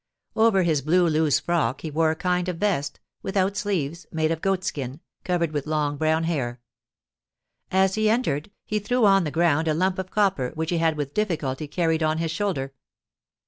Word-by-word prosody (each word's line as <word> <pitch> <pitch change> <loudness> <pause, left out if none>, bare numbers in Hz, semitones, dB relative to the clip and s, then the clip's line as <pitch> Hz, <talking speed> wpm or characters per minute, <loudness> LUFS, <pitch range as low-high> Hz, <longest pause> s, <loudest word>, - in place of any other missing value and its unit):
Over 220 -4 +4
his 160 -4 +1
blue 175 +5 +3
loose 155 -2 +2
frock 170 -6 0
he 160 - -5
wore 160 +2 +2
a 160 - 0
kind 180 +1 0
of 180 - -3
vest, 180 -7 -1 0.2
without 195 0 0
sleeves, 170 -6 -2
made 160 0 0
of 160 -1 -2
goatskin, 155 -8 -2 0.2
covered 170 -3 0
with 145 -1 -3
long 150 -2 0
brown 160 +2 +1
hair. 130 -8 -2 1.1
As 190 0 +3
he 215 +1 +2
entered, 210 - 0 0.2
he 210 - -1
threw 235 +3 +1
on 195 -3 +5
the - - -1
ground 165 0 +2
a 155 - +2
lump 185 +3 0
of 185 0 -4
copper, 190 -12 +1
which 160 +1 -2
he 170 - +1
had 160 -1 +1
with 145 -1 -4
difficulty 155 -9 -2
carried 165 +1 0
on 155 0 +1
his 165 -1 -1
shoulder. 160 -7 -2
165 Hz, 185 wpm, -24 LUFS, 150-190 Hz, 1.1 s, on